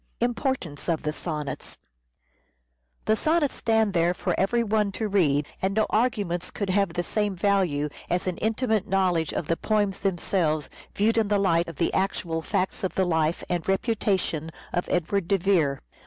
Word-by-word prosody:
importance 240 Hz, -, -1 dB
The 155 Hz, -3 st, 0 dB
Sonnets 150 Hz, -3 st, -5 dB, 1.8 s
stand 220 Hz, -3 st, +1 dB
there 170 Hz, +1 st, +2 dB
for -, -, -1 dB
every 235 Hz, +5 st, +2 dB
one 210 Hz, -2 st, +1 dB
to 220 Hz, -, -2 dB
read, 150 Hz, -8 st, +2 dB, 0.2 s
and 195 Hz, +2 st, 0 dB
Sonnets. 215 Hz, -, +1 dB
no -, -, +4 dB
arguments 205 Hz, -7 st, 0 dB
could 200 Hz, -2 st, -3 dB
have 195 Hz, -3 st, +1 dB
the 175 Hz, -, -1 dB
same 210 Hz, +1 st, -1 dB
value 180 Hz, -6 st, +1 dB, 0.2 s
as 175 Hz, +1 st, 0 dB
an 185 Hz, -2 st, -2 dB
intimate 220 Hz, -2 st, 0 dB
knowledge 180 Hz, -4 st, +1 dB
of -, -, -2 dB
the 165 Hz, +2 st, 0 dB
poems 205 Hz, -3 st, 0 dB
themselves 170 Hz, -5 st, 0 dB, 0.2 s
viewed 225 Hz, +3 st, +3 dB
in 220 Hz, -, +1 dB
the 205 Hz, 0 st, +2 dB
light 170 Hz, -4 st, +2 dB
of 165 Hz, -, -7 dB
the 170 Hz, -, 0 dB
actual 175 Hz, -4 st, -1 dB
facts 190 Hz, +3 st, -1 dB
of 190 Hz, -, -2 dB
the 190 Hz, -, +2 dB
life 160 Hz, -1 st, +1 dB
and 175 Hz, -2 st, -2 dB
reputation 195 Hz, -6 st, 0 dB, 0.2 s
of 175 Hz, -, -1 dB
Edward 180 Hz, +1 st, 0 dB
de 195 Hz, -, +3 dB
Vere. 170 Hz, -7 st, +2 dB
190 Hz, 165 wpm, -26 LUFS, 165-205 Hz, 1.8 s, no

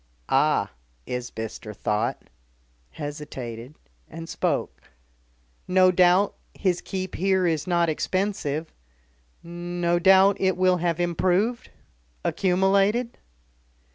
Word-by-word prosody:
"Ah!" -, -, +2 dB, 0.3 s
Isbister 110 Hz, -3 st, -6 dB
thought, 105 Hz, +3 st, -1 dB, 0.7 s
hesitated 140 Hz, -, -7 dB, 0.3 s
and 165 Hz, +1 st, -8 dB
spoke: -, -, -2 dB, 0.9 s
"No 185 Hz, 0 st, +5 dB
doubt 180 Hz, +2 st, +4 dB, 0.2 s
his 180 Hz, -3 st, 0 dB
keep 185 Hz, -1 st, -5 dB
here 190 Hz, 0 st, +1 dB
is 160 Hz, -2 st, 0 dB
not 170 Hz, -1 st, +2 dB
expensive 160 Hz, -2 st, -2 dB, 0.7 s
no 175 Hz, 0 st, -2 dB
doubt 190 Hz, +2 st, +6 dB
it 190 Hz, -2 st, +1 dB
will 185 Hz, 0 st, +3 dB
have 170 Hz, -1 st, -1 dB
improved 185 Hz, +7 st, 0 dB, 0.6 s
accumulated?" 195 Hz, +5 st, +1 dB
175 Hz, 90 wpm, -25 LUFS, 155-190 Hz, 0.9 s, doubt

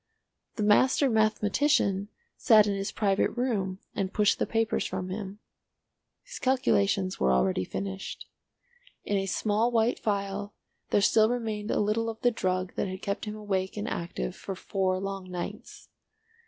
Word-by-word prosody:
The 215 Hz, -, -2 dB
master 260 Hz, +6 st, +4 dB
mathematician 215 Hz, -1 st, +2 dB, 0.3 s
sat 215 Hz, -4 st, +6 dB
in 205 Hz, -, 0 dB
his 195 Hz, +1 st, -3 dB
private 200 Hz, -2 st, +1 dB
room 205 Hz, -7 st, -1 dB, 0.2 s
and 195 Hz, -2 st, -2 dB
pushed 210 Hz, 0 st, +2 dB
the -, -, 0 dB
papers 225 Hz, 0 st, 0 dB
from 185 Hz, 0 st, -4 dB
him. 195 Hz, +1 st, -5 dB, 0.9 s
His -, -, -9 dB
calculations 200 Hz, -7 st, +1 dB
were 65 Hz, -, +3 dB
already 95 Hz, +9 st, +2 dB
finished. 195 Hz, -, -5 dB, 0.8 s
In 205 Hz, -, -1 dB
a 195 Hz, 0 st, -1 dB
small 215 Hz, +4 st, +1 dB
white 230 Hz, 0 st, +2 dB
phial 200 Hz, -1 st, -2 dB, 0.3 s
there 205 Hz, -, +3 dB
still 220 Hz, +2 st, +4 dB
remained 220 Hz, -3 st, -3 dB
a -, -, +1 dB
little 215 Hz, +2 st, +1 dB
of 225 Hz, 0 st, -6 dB
the 245 Hz, -, +4 dB
drug 185 Hz, -4 st, -1 dB
that -, -, 0 dB
had 185 Hz, +1 st, -7 dB
kept 200 Hz, +2 st, -2 dB
him 210 Hz, 0 st, -5 dB
awake 195 Hz, -2 st, -2 dB
and 205 Hz, -, -3 dB
active 65 Hz, -, -4 dB
for 195 Hz, -, -6 dB
four 185 Hz, 0 st, -1 dB
long 195 Hz, -1 st, -5 dB
nights. 180 Hz, -1 st, -7 dB
205 Hz, 155 wpm, -28 LUFS, 190-220 Hz, 0.9 s, sat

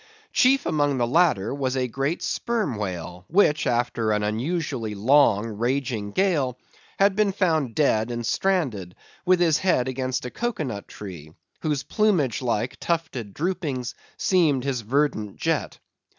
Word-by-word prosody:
Chief 270 Hz, +2 st, +4 dB
among 145 Hz, -3 st, +1 dB
these 120 Hz, -1 st, +1 dB
latter 140 Hz, -, +2 dB
was 135 Hz, -2 st, -1 dB
a 130 Hz, -1 st, 0 dB
great 135 Hz, +6 st, -2 dB
Sperm 225 Hz, -, -1 dB
Whale, 90 Hz, -3 st, -5 dB
which, 155 Hz, -5 st, +3 dB
after 120 Hz, -2 st, 0 dB
an 105 Hz, 0 st, +1 dB
unusually 120 Hz, 0 st, -2 dB
long 115 Hz, -1 st, +4 dB
raging 120 Hz, 0 st, -2 dB
gale, 145 Hz, -, +1 dB, 0.4 s
had 195 Hz, 0 st, +4 dB
been 210 Hz, -1 st, +2 dB
found 160 Hz, -, 0 dB
dead 115 Hz, -6 st, +2 dB
and 120 Hz, -1 st, -3 dB
stranded, 125 Hz, -, 0 dB, 0.3 s
with 185 Hz, -1 st, +5 dB
his 165 Hz, -4 st, +3 dB
head 155 Hz, -9 st, +2 dB
against 130 Hz, -1 st, -2 dB
a 125 Hz, -, -5 dB
cocoa 240 Hz, -8 st, -2 dB
nut 105 Hz, -7 st, -5 dB
tree, 85 Hz, -7 st, -9 dB, 0.3 s
whose 150 Hz, -4 st, -1 dB
plumage 180 Hz, -, +1 dB
like, 120 Hz, -1 st, -1 dB
tufted 160 Hz, -11 st, -2 dB
droopings 145 Hz, -7 st, -2 dB, 0.2 s
seemed 155 Hz, -9 st, +2 dB
his 135 Hz, -3 st, -1 dB
verdant 115 Hz, -4 st, 0 dB
jet. -, -, -1 dB
130 Hz, 145 wpm, -24 LUFS, 115-165 Hz, 0.4 s, with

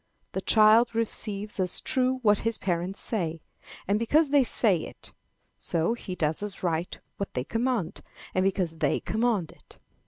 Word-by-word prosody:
The -, -, -3 dB
child 225 Hz, +2 st, +5 dB
receives 210 Hz, -2 st, -3 dB
as 180 Hz, -2 st, 0 dB
true 260 Hz, 0 st, +1 dB
what 210 Hz, -2 st, +4 dB
his 230 Hz, -1 st, -1 dB
parents 180 Hz, +1 st, -2 dB
say, 165 Hz, -7 st, -2 dB, 0.4 s
and 205 Hz, +2 st, +2 dB
because 290 Hz, +6 st, +3 dB
they 285 Hz, -2 st, +5 dB
say 220 Hz, -5 st, +2 dB
it; -, -, -10 dB, 0.5 s
so, 170 Hz, +6 st, 0 dB
he 200 Hz, -6 st, -6 dB
does 155 Hz, 0 st, 0 dB
as 205 Hz, -2 st, -6 dB
right 170 Hz, 0 st, -1 dB, 0.2 s
what 200 Hz, -, -5 dB
they 125 Hz, -, -1 dB
command, 230 Hz, -, -1 dB, 0.3 s
and 185 Hz, -, +2 dB
because 185 Hz, -4 st, 0 dB
they -, -, +1 dB
command 220 Hz, -6 st, 0 dB
it. -, -, -18 dB
205 Hz, 160 wpm, -27 LUFS, 175-230 Hz, 0.5 s, child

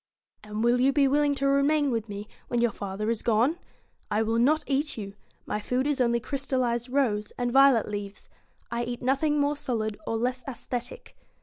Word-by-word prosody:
* -, -, -49 dB
And 215 Hz, +1 st, -4 dB
will 240 Hz, +1 st, +3 dB
you 270 Hz, +2 st, +4 dB
be 275 Hz, 0 st, +3 dB
willing 290 Hz, +1 st, +2 dB
to 275 Hz, 0 st, 0 dB
remain 280 Hz, +1 st, +3 dB
with 225 Hz, -2 st, -2 dB
me, 205 Hz, +1 st, -6 dB, 0.2 s
when 240 Hz, -, 0 dB
your 235 Hz, -1 st, +2 dB
father 205 Hz, +2 st, -3 dB
is 230 Hz, -, -2 dB
gone? 240 Hz, +9 st, +2 dB, 0.5 s
I 215 Hz, +2 st, +1 dB
will 225 Hz, +1 st, 0 dB
not 300 Hz, +6 st, +3 dB
eat 285 Hz, 0 st, -1 dB
you 200 Hz, -2 st, -6 dB, 0.3 s
my 210 Hz, -, -2 dB
food 250 Hz, +5 st, -1 dB
is 290 Hz, -2 st, 0 dB
only 235 Hz, -1 st, +2 dB
crystallised 255 Hz, -2 st, -1 dB
rose 235 Hz, -6 st, +1 dB
and 245 Hz, -1 st, -1 dB
violet 270 Hz, -3 st, +5 dB
leaves. 205 Hz, -1 st, -6 dB, 0.4 s
I 235 Hz, 0 st, -1 dB
eat 240 Hz, 0 st, -5 dB
nothing 290 Hz, +4 st, +2 dB
more 290 Hz, +1 st, +1 dB
solid 220 Hz, -6 st, -3 dB
or 225 Hz, -, 0 dB
less 250 Hz, +2 st, -1 dB
aesthetic.' 250 Hz, -, -6 dB
245 Hz, 195 wpm, -27 LUFS, 225-275 Hz, 0.5 s, violet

